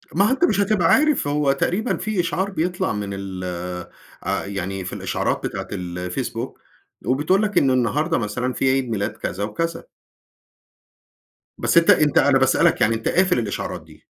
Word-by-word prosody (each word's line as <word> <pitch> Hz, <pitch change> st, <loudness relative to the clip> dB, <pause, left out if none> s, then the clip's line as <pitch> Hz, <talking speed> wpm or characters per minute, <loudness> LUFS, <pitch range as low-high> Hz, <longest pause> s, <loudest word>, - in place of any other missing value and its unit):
ما 195 Hz, +4 st, +4 dB
هو 215 Hz, -, +2 dB
أنت 270 Hz, -, -1 dB
مش 275 Hz, -, +1 dB
هتبقى 200 Hz, -4 st, +2 dB
عارف، 300 Hz, -, +3 dB
هو 145 Hz, -1 st, +2 dB
تقريبًا 185 Hz, -, 0 dB
في 210 Hz, +1 st, -2 dB
إشعار 175 Hz, +3 st, 0 dB
بيطلع 175 Hz, -, -1 dB
من 100 Hz, -1 st, -4 dB
ال 95 Hz, -1 st, -6 dB, 0.8 s
آآ، -, -, -1 dB
يعني 95 Hz, -1 st, -4 dB
في -, -, -5 dB
الإشعارات -, -, -2 dB
بتاعة -, -, -6 dB
الفيسبوك، 90 Hz, -1 st, -4 dB, 0.5 s
وبتقول 150 Hz, +10 st, +2 dB
لك 210 Hz, -3 st, -1 dB
إنّه 135 Hz, -4 st, +4 dB
النهارده 150 Hz, +7 st, +1 dB
مثلًا 125 Hz, +3 st, -2 dB
في 135 Hz, -, +1 dB
عيد 130 Hz, -2 st, 0 dB
ميلاد 105 Hz, -3 st, -1 dB
كذا 100 Hz, -, -4 dB
وكذا. 165 Hz, +11 st, -3 dB, 1.7 s
بس -, -, +1 dB
أنت 170 Hz, -, +5 dB
أنت 150 Hz, -3 st, +5 dB
أنا -, -, +5 dB
باسألك -, -, +3 dB
يعني، 115 Hz, +1 st, +3 dB
أنت 115 Hz, -, -4 dB
قافل 185 Hz, -6 st, +3 dB
الإشعارات 110 Hz, -4 st, -4 dB
دي؟ -, -, -18 dB
140 Hz, 165 wpm, -22 LUFS, -, 1.7 s, أنت